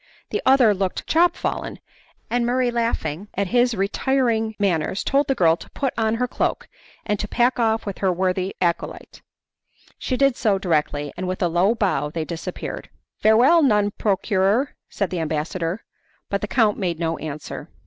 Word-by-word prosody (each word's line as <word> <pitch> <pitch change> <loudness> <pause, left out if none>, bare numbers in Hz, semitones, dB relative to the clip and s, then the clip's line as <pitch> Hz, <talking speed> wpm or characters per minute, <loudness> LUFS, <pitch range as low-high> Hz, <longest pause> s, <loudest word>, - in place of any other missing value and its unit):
The 425 - -1
other 260 -5 +6
looked 190 -1 -2
chop 340 +2 +3
fallen, - - -3 0.5
and 245 0 0
Murray 245 +1 +1
laughing 230 -6 -2
at 200 -1 -1
his 245 -1 +3
retiring 225 +2 0
manners 190 -2 0
told 280 +1 +2
the 270 - +1
girl 165 -7 +4
to - - -13
put 270 -3 -2
on 220 0 +1
her 250 +2 0
cloak - - -2 0.4
and 210 -1 -1
to 210 - -3
pack 245 +3 +1
off 225 -1 +1
with 200 -2 -5
her 190 -2 +2
worthy 185 +1 -1
acolyte. 170 -2 -3 0.8
She 255 - -2
did 275 -2 +3
so 210 -5 +1
directly, 150 -5 -1
and 185 - -4
with 185 0 -2
a - - +3
low 180 +7 +2
bow 180 -10 0
they 160 +1 -3
disappeared. 170 +2 -6 0.3
"Farewell, 245 +10 +5
nun 210 -7 +3
procurer!" 205 +5 +1 0.2
said 200 -4 -2
the 180 - -2
ambassador, 165 +4 -2 0.5
but 200 - 0
the 210 - -2
count 215 -3 +2
made 175 -4 -1
no 165 -1 -1
answer. 155 -1 -7
205 Hz, 170 wpm, -22 LUFS, 180-240 Hz, 0.8 s, other